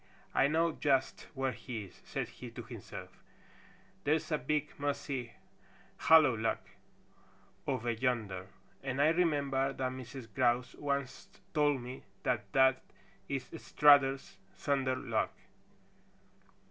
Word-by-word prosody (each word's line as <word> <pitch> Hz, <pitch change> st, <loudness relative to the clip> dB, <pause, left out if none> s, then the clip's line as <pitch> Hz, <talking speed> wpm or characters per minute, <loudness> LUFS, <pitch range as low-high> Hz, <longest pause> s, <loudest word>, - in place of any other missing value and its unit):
"I 135 Hz, -, +4 dB
know 165 Hz, +3 st, +2 dB
just 135 Hz, -4 st, 0 dB
where 135 Hz, -1 st, 0 dB
he 120 Hz, -4 st, -6 dB
is," 95 Hz, -, -15 dB
said -, -, -3 dB
he -, -, -9 dB
to -, -, -8 dB
himself. -, -, -9 dB, 0.8 s
"There's 155 Hz, +2 st, +1 dB
a 155 Hz, -, +2 dB
big, 150 Hz, +3 st, -1 dB
mossy, 140 Hz, -4 st, -2 dB, 0.6 s
hollow 155 Hz, -6 st, +6 dB
log 115 Hz, +1 st, 0 dB, 1.1 s
over 120 Hz, -3 st, 0 dB
yonder, 110 Hz, -6 st, -1 dB, 0.3 s
and 135 Hz, 0 st, -3 dB
I 145 Hz, +2 st, +6 dB
remember 140 Hz, -5 st, +1 dB
that 130 Hz, -1 st, -2 dB
Mrs. 130 Hz, -1 st, -8 dB
Grouse 125 Hz, +1 st, +2 dB
once 140 Hz, -2 st, -3 dB, 0.3 s
told 145 Hz, -4 st, +3 dB
me 125 Hz, +2 st, -7 dB, 0.2 s
that 105 Hz, -5 st, -1 dB
that 130 Hz, 0 st, +5 dB, 0.5 s
is 135 Hz, -2 st, -2 dB
Strutter's 135 Hz, -8 st, +4 dB, 0.2 s
thunder 135 Hz, +3 st, 0 dB
log." -, -, 0 dB
135 Hz, 120 wpm, -33 LUFS, 125-145 Hz, 1.1 s, hollow